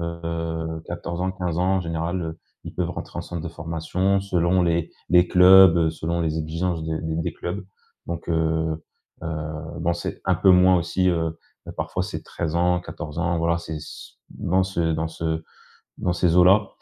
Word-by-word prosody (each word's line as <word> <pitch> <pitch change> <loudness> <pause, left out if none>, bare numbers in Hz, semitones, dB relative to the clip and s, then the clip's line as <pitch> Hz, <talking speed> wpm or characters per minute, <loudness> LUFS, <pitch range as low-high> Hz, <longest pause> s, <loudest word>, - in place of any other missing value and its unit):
heu, 85 -1 -4
14 85 0 -5
ans, 95 0 0
15 90 -3 -3
ans 95 +2 +2
en 95 - 0
général, 85 +1 -2
heu. 80 0 -5 0.3
Ils - - -8
peuvent 90 -1 -1
rentrer - - -7
en - - -3
centre 85 -2 -6
de 85 - -4
formation 85 +4 -1
selon 90 -1 +2
les 85 -1 +1 0.2
les 90 0 +5
clubs, 95 -1 +8
heu, 80 -1 +3
selon 85 +2 -2
les 80 -1 0
exigences 80 +2 -2
de 80 0 -2
des 80 -1 -3
des 85 - -2
clubs. 90 +3 -5 0.4
Donc, 85 0 -5
heu, 80 -1 0 0.4
heu, 80 - -3 0.5
bon 85 +1 +1
c'est - - -5
un 95 0 +3
peu 95 +3 +4
moins 90 0 +6
aussi, 90 +2 +1
heu, 80 -2 -1 0.3
ben, - - -7
parfois - - -3
c'est - - -5
13 80 -2 -4
ans, 90 0 +2
14 75 -2 -7
ans 85 0 0
voilà 85 +1 +1
c'est 80 -2 -6
c - - -10 0.2
dans 95 +2 0
ce 85 -3 0
dans 80 0 -1
ce 80 0 -3 0.6
dans 90 - 0
ces 85 -1 +2
eaux-là. 95 +3 +6
85 Hz, 195 wpm, -24 LUFS, 80-90 Hz, 0.6 s, clubs